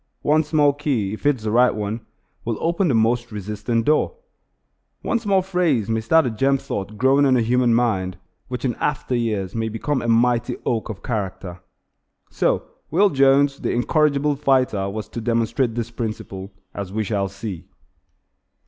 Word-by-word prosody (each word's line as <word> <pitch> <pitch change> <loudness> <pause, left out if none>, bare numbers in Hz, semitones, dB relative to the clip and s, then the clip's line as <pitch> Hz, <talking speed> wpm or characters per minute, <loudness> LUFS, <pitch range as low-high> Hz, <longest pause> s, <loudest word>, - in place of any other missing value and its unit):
One 155 +2 +3
small 150 -2 +3
key, 135 -9 -1
if 110 - -3
it 145 - +4
is 115 - -13
the 110 - -1
right 125 +1 +4
one, 105 +2 -4 0.4
will 115 -2 -2
open 170 +3 +1
the 135 - +2
most 120 +2 +1
resisting 105 +3 -2
door. 155 - +1 0.9
One 235 - 0
small 200 -4 +1
phrase 170 - 0
may 110 0 0
start 160 +7 +4
a 125 - -1
germ 135 +5 +2
thought 105 -4 -5
growing 135 +4 +4
in 130 -2 +4
a - - +2
human 120 0 +2
mind 95 -6 0 0.3
which 125 -1 -4
in 125 - +1
after 140 -3 -1
years 105 -6 -1
may 115 -1 -2
become 130 +5 -2
a - - -4
mighty 120 +1 +2
oak 115 -2 -1
of 100 -3 -7
character. 95 -5 -4 0.7
So - - +1 0.3
Will 195 +6 +3
Jones, 140 0 +3
the - - -2
incorrigible 145 +3 +2
fighter 130 -8 +1
was 105 +1 -5
to 115 - -6
demonstrate 115 +1 0
this 120 -1 -3
principle, 110 -4 -5 0.2
as 100 -2 -6
we 110 +2 -1
shall 100 -2 -1
see. 100 -2 -7
120 Hz, 175 wpm, -22 LUFS, 110-140 Hz, 0.9 s, it